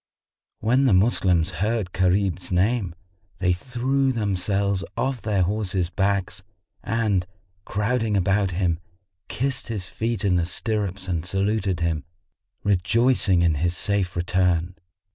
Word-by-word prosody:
When 125 +5 +3
the 125 - +4
Moslems 95 -4 +3
heard 105 -3 0
Gharib's 95 -1 0
name, 95 0 +1 0.4
they 90 -2 +2
threw 130 +6 0
themselves 100 -3 0
off 130 0 -1
their 100 -4 +1
horses' 95 -2 -1
backs, 95 -1 0 0.4
and, 105 -6 0 0.4
crowding 110 +1 0
about 100 +1 +2
him, 90 -2 0 0.5
kissed 130 +1 -2
his 100 -7 -4
feet 110 +2 -2
in 90 -3 +3
the 85 - +1
stirrups 100 0 -2
and 85 -3 -1
saluted 95 -1 0
him, 80 -3 0 0.6
rejoicing 105 -1 +2
in 85 -2 +3
his 85 0 0
safe 100 -3 0
return. 90 0 +1
100 Hz, 125 wpm, -24 LUFS, 90-110 Hz, 0.6 s, the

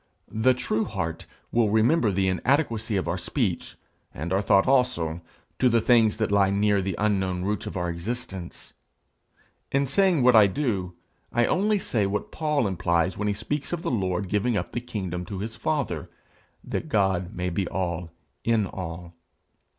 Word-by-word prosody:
The 125 +4 +3
true 115 -3 -1
heart 85 -6 -4 0.2
will 115 -2 +3
remember 110 +4 +3
the 95 0 +1
inadequacy 115 - +1
of 95 - -2
our 85 +2 -1
speech, 95 - -2 0.4
and 80 +6 -3
our 95 - +2
thought 100 +1 +4
also, 125 -12 +1 0.4
to 130 - +4
the 115 -1 +3
things 115 -2 +4
that - - 0
lie 100 -1 +4
near 100 0 +2
the 95 -1 -2
unknown 95 -4 0
roots 105 +1 -2
of - - -5
our 90 -1 -1
existence. 95 +1 -6 1.0
In 140 +1 +2
saying 170 +1 +3
what 125 -1 +6
I 105 -2 +8
do, 100 -7 -2 0.4
I 120 0 +3
only 210 - +2
say 110 - 0
what 100 +1 -3
Paul 150 -5 0
implies 90 -2 +1
when 105 - -2
he 105 - +1
speaks 145 +7 -3
of 170 -1 -3
the - - -1
Lord 95 -4 -1
giving 105 +4 +1
up - - -3
the 120 - -3
kingdom 95 -7 -4
to 100 0 -6
his 110 +3 -5
father, 145 +4 -2 0.5
that 160 - -4
God 95 -5 +1
may 90 +1 -2
be 90 +2 -1
all 90 -2 -3 0.3
in 115 -3 +2
all. 85 -2 -7
105 Hz, 175 wpm, -26 LUFS, 90-120 Hz, 1.0 s, I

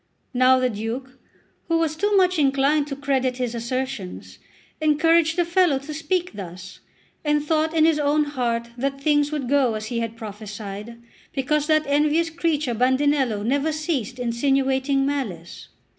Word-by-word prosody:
Now 255 +1 +5
the 255 -1 +1
Duke, 240 +5 -5 0.5
who 330 - +2
was 325 -2 0
too 410 +4 +1
much 365 -2 +3
inclined 280 +1 +2
to 280 - -4
credit 265 -2 0
his 250 -2 -2
assertions, 235 -4 -5 0.4
encouraged 320 +1 +3
the 350 - +2
fellow 340 -4 +3
to 275 +3 -7
speak 335 +2 -2
thus, 185 -2 -9 0.4
and 295 -1 +1
thought 315 +1 +1
in 315 -1 +5
his 320 -2 +3
own 295 +1 +2
heart 240 -5 -2
that 275 +1 -2
things 290 0 +2
would 295 -4 -3
go 265 -4 +2
as 215 0 -4
he 230 - 0
had 230 0 -4
prophesied, 210 +1 -8 0.3
because 295 +2 0
that 310 -1 +3
envious 300 +3 +2
creature 310 -6 0
Bandinello 260 -2 +1
never 280 +5 +1
ceased 300 -7 -2
insinuating 270 +2 +1
malice. 220 -13 -4
275 Hz, 155 wpm, -23 LUFS, 240-305 Hz, 0.5 s, Now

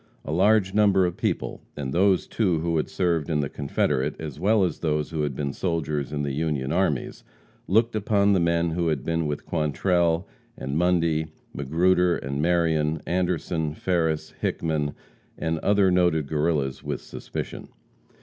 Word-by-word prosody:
A - - -4
large 95 +3 +3
number 100 -3 +4
of 90 -1 -2
people, - - -2 0.2
and 70 -2 -3
those, 95 +2 +3
too, 90 -8 0
who 85 0 0
had 75 - -1
served 85 -5 0
in 75 -2 +1
the 70 - -2
Confederate, 70 -2 -1
as 75 -3 -6
well 105 +3 +3
as 90 - -1
those 75 -1 -1
who 80 -2 -2
had 75 -3 -1
been 70 -1 -2
soldiers 75 -6 -2
in 75 -1 -2
the 70 - -1
Union 75 -2 -1
armies, 85 -5 -1 0.4
looked 110 +5 +2
upon 100 -1 +2
the 95 - +3
men 85 0 +1
who 85 +1 0
had 75 -5 -1
been 85 -1 0
with 75 0 -4
Quantrell, 85 +2 +1 0.3
and 70 +1 -4
Mundy, 85 -2 +2 0.3
Magruder 90 +5 +2
and 70 +2 -3
Marion, 80 -2 +1
Anderson, 85 -3 -1
Farris, 80 -4 0
Hickman 75 -3 -1 0.4
and 80 -1 -1
other 100 0 +3
noted 85 -4 +2
Guerrillas, 75 -3 0
with - - -3
suspicion. - - -6
80 Hz, 160 wpm, -25 LUFS, 75-90 Hz, 0.4 s, number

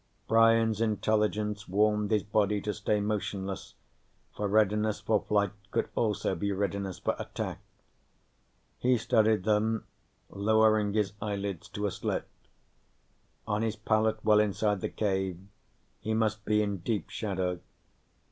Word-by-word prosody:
Brian's 115 -1 +4
intelligence 105 -1 0
warned 105 +2 +2
his 105 -3 +2
body 105 0 +1
to 105 +1 -3
stay 105 0 0
motionless, 100 -2 -3 0.6
for 105 - -1
readiness 105 +1 +2
for 110 -2 +1
flight 100 -2 +1 0.2
could - - -1
also 105 -3 0
be 100 +3 -2
readiness 100 -1 -2
for - - -1
attack. - - -4 1.2
He 125 0 +3
studied 110 -3 +2
them, 110 +1 +1 0.5
lowering 110 0 +3
his 105 -2 +1
eyelids 100 -4 -3
to 105 - -3
a 100 - 0
slit. - - -3 1.2
On 105 -1 -1
his 110 -1 -1
pallet 110 0 0
well 105 -1 +6
inside 105 -1 +1
the - - -2
cave, 95 -4 -1 0.6
he 110 0 -2
must 110 -1 0
be 105 0 +3
in 100 -1 -2
deep 105 +4 -3
shadow. 95 -4 -2
105 Hz, 130 wpm, -29 LUFS, 100-110 Hz, 1.2 s, well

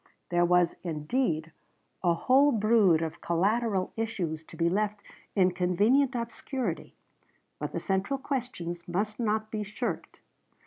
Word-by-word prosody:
There 175 0 +3
was 180 -1 +3
indeed 160 - -1 0.5
a 170 -2 +3
whole 270 +10 +4
brood 210 - +4
of 160 0 -5
collateral 195 +3 +1
issues 185 -9 -3
to - - -13
be 170 - +2
left 205 +3 0 0.4
in 185 -2 +4
convenient 210 +10 +2
obscurity, 235 - -4 0.6
but - - -3
the - - -2
central 195 +7 0
questions 245 - -4
must 210 +5 -2
not 215 -1 0
be 215 - -2
shirked. 210 +1 -4
200 Hz, 130 wpm, -29 LUFS, 175-230 Hz, 0.6 s, whole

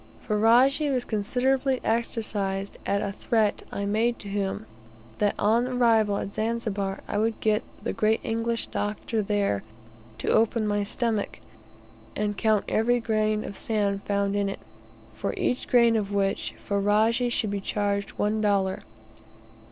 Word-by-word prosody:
Ferajji 240 +7 +4
was 255 -2 0
considerably 255 +5 +1
exercised 210 -4 -1
at 200 0 +1
a 200 - -2
threat 215 +1 0
I 200 - -3
made 225 +4 +1
to 205 - -9
him 200 +1 -2 0.5
that 205 -1 +2
on 230 +4 +2
arrival 225 -5 +3
at 200 - -4
Zanzibar, 215 -4 -2
I 205 - -1
would 225 0 0
get 215 0 +2 0.2
the - - -2
great 220 +1 +2
English 230 +1 -1
doctor 215 +2 -2
there 200 - 0 0.6
to - - -6
open 225 0 +2
my 205 0 +1
stomach, 215 0 -1 0.8
and 210 0 -1
count 215 -1 +2
every 240 +3 +2
grain 215 -2 0
of 200 - -7
sand 200 -2 0
found 200 0 0
in 200 -1 +1
it, 195 - -6 0.5
for - - -3
each 250 - -1
grain 235 -2 +5
of 205 -2 -1
which 195 -1 -1
Ferajji 215 +4 +2
should 220 -3 0
be 200 -1 -2
charged 200 0 -1
one 215 +1 0
dollar. 195 -2 +1
215 Hz, 145 wpm, -26 LUFS, 200-230 Hz, 0.8 s, grain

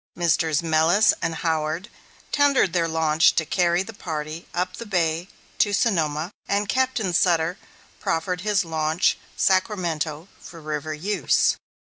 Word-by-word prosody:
Messrs. 165 -2 +1
Mellus 165 +6 +4
and 165 0 -1
Howard 160 +3 -1 0.4
tendered 280 - +3
their 170 -2 +1
launch 160 -1 +3
to 160 - +1
carry 175 +2 +1
the 225 - -10
party 155 -3 -6
up 180 +1 -3
the 235 - -7
bay 170 -3 0 0.3
to 205 - +3
Sonoma, 165 -6 0 0.2
and 200 +1 0
Captain 250 -6 0
Sutter 170 0 +2 0.4
proffered 180 +2 -2
his 205 -2 +1
launch 160 +1 0 0.2
Sacramento 175 -5 0
for 170 - -12
river 155 0 -4
use. 180 -1 +1
170 Hz, 130 wpm, -23 LUFS, 160-190 Hz, 0.4 s, Mellus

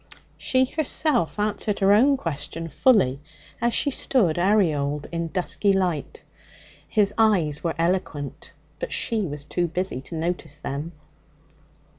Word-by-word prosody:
She 260 0 +2
herself 290 - 0
answered 210 0 -1
her 195 +1 +4
own 270 +6 +5
question 165 - -5
fully 150 - +3 0.4
as 235 0 +2
she 285 - +2
stood 210 - +1
aureoled 155 -7 +2
in 170 0 -2
dusky 190 +3 0
light. 185 - -1 0.7
His 205 -2 +2
eyes 175 -10 +2
were 165 -2 -1
eloquent, 165 -5 -2 0.3
but - - -4
she 225 -2 0
was 145 -1 -7
too 175 +2 -1
busy 175 -5 -2
to 165 - -8
notice 165 -2 -3
them. 155 +3 -5
180 Hz, 130 wpm, -24 LUFS, 155-215 Hz, 0.7 s, own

